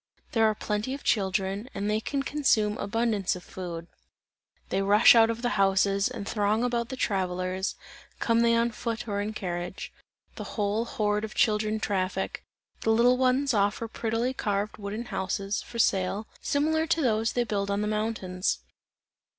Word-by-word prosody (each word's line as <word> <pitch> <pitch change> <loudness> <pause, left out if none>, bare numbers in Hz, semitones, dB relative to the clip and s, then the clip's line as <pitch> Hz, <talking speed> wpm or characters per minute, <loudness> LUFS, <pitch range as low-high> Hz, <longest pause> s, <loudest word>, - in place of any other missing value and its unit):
There 225 -2 +3
are 215 - -1
plenty 210 +6 -2
of 280 - -10
children, 195 +2 0
and 200 0 -2
they 210 +1 +1
can 275 +3 -2
consume 230 -8 +2
abundance 210 -2 0
of 180 - -9
food; 170 -3 -6 0.8
they 195 - 0
rush 205 +3 +7
out 225 -1 +6
of 230 +1 -3
the 240 -4 +1
houses, 195 +1 +3
and 200 - -6
throng 210 +2 +1
about 235 -1 -1
the 260 - -4
travellers, 185 -3 -1 0.4
come 230 -1 +2
they 230 0 +4
on 235 +1 +2
foot 230 +1 -4
or 200 -1 -1
in 210 +1 -2
carriage. 175 -2 -5 0.4
The - - -4
whole 210 +2 0
horde 210 -2 0
of 220 - -6
children 215 -2 +2
traffic; 190 -3 -2 0.4
the - - 0
little 240 +3 +4
ones 260 +1 +2
offer 205 +2 +1
prettily 230 +3 -1
carved 205 -3 -2
wooden 210 +3 -5
houses, 195 0 -2
for 235 - -9
sale, 195 -1 +1 0.2
similar 315 +3 +1
to 330 0 +2
those 225 -2 +1
they 245 - +2
build 200 -3 -2
on 200 +1 0
the 210 - -1
mountains. 210 -4 -1
215 Hz, 165 wpm, -27 LUFS, 200-235 Hz, 0.8 s, rush